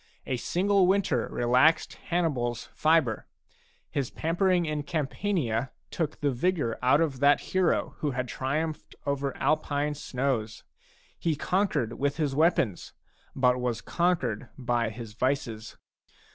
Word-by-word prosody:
A 130 - -1
single 190 - +2
winter 185 -11 +2
relaxed 125 +7 +3
HannibaFs 130 -9 -1
fibre; 155 -8 +2 0.6
his 140 -4 -1
pamper 170 +4 0
ing 180 -2 +3
in 150 -1 -2
Campania 145 - -1 0.2
took 155 -3 -3
the 145 -1 +2
vigour 140 -3 0
out 130 +5 +4
of 145 -6 0
that 145 +1 +5
hero 185 -2 +2
who 150 - 0
had 125 -1 -2
triumphed 150 +6 -3
over 140 -1 -2
Alpine 150 -1 0
snows. 125 -6 -2 0.6
He 165 -2 0
con 185 +7 +1
quered 115 - -2
with 140 +1 0
his 150 -4 0
weapons, 145 - +1 0.4
but 125 -1 +3
was 120 -2 -1
conquered 165 -12 0
by 120 -3 0
his 110 0 -8
vices. 115 -3 -2
140 Hz, 130 wpm, -28 LUFS, 125-165 Hz, 0.6 s, that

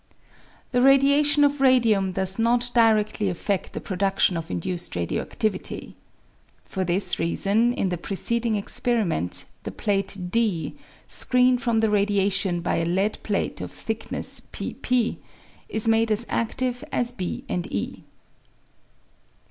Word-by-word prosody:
The 245 -1 +2
radiation 280 +2 +5
of 285 -1 +2
radium 230 -8 +4
does 190 +2 -1
not 240 +1 +2
diredly 215 -3 +3
afted 185 +2 -2
the - - -4
pro 190 - -5
duction 195 -1 +2
of 165 0 -5
induced 175 - -3
radio 85 -1 -2
adivity. - - -3 0.7
For 190 - -3
this 180 +1 0
reason, 200 +7 +1
in 195 - -1
the 175 -2 -3
preceding 230 +5 0
experiment 200 - 0 0.2
the - - -6
plate 200 -1 -1
D, 215 -8 0 0.3
screened 250 0 +2
from 230 -2 +1
the 220 - +3
radia 200 -1 +2
tion 190 -2 0
by - - 0
a 165 - 0
lead 190 +5 0
plate 205 -2 -2
of - - -5
thickness, 220 0 -3
p - - -5
P, 250 -2 0 0.5
is 220 +1 +3
made 225 0 +3
as 215 +2 +2
adive 245 +2 -2
as 240 0 +1
B 185 -7 -5
and 175 -1 -3
e. 100 - -4
215 Hz, 140 wpm, -24 LUFS, 190-240 Hz, 0.7 s, radiation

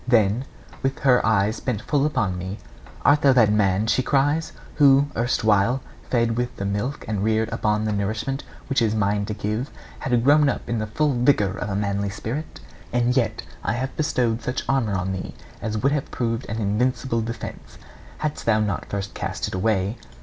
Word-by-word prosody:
Then, 115 0 +3 0.4
with 135 0 -1
her 125 -3 +4
eyes 110 0 +2
bent 120 -4 -2
full 145 +1 +2
upon 105 -11 0
me, 95 +3 -5 0.5
'Art 145 +1 +5
thou 135 -2 +6
that 115 -5 +5
man,' 100 -1 +2
she 115 +3 +2
cries, 145 +4 +1 0.3
'who, 140 -1 +6
erstwhile 115 0 +2 0.3
fed 115 -2 +2
with 125 0 -2
the 100 - -4
milk 105 +8 -2
and 105 -2 -1
reared 110 0 +1
upon 105 0 +1
the 110 - 0
nourishment 110 +7 -2 0.2
which 135 -3 +1
is 110 -1 +2
mine 100 -1 +1
to 105 - -4
give, 105 +6 -2 0.3
had 120 -3 +1
grown 145 +2 +5
up - - -3
to - - -3
the 110 -1 -2
full 145 +7 +1
vigour 120 -5 +3
of 100 +1 -4
a 95 - -2
manly 100 0 -1
spirit? 120 +9 -5 0.3
And 120 +1 +2
yet 110 -5 0 0.2
I - - 0
had 130 +2 -3
bestowed 120 -6 0
such 125 - -3
armour 120 -7 +1
on 90 +1 -2
thee 95 -1 -5 0.3
as 110 -1 -2
would 135 +6 +2
have 145 -2 -1
proved 115 0 -2
an 110 - -3
invincible 115 +3 0
defence, 115 0 -7 0.4
hadst 150 -5 -3
thou 110 -1 +4
not 105 -3 -2
first 100 0 -4
cast - - -3
it - - -9
away. 100 +2 0
115 Hz, 190 wpm, -23 LUFS, 105-130 Hz, 0.5 s, thou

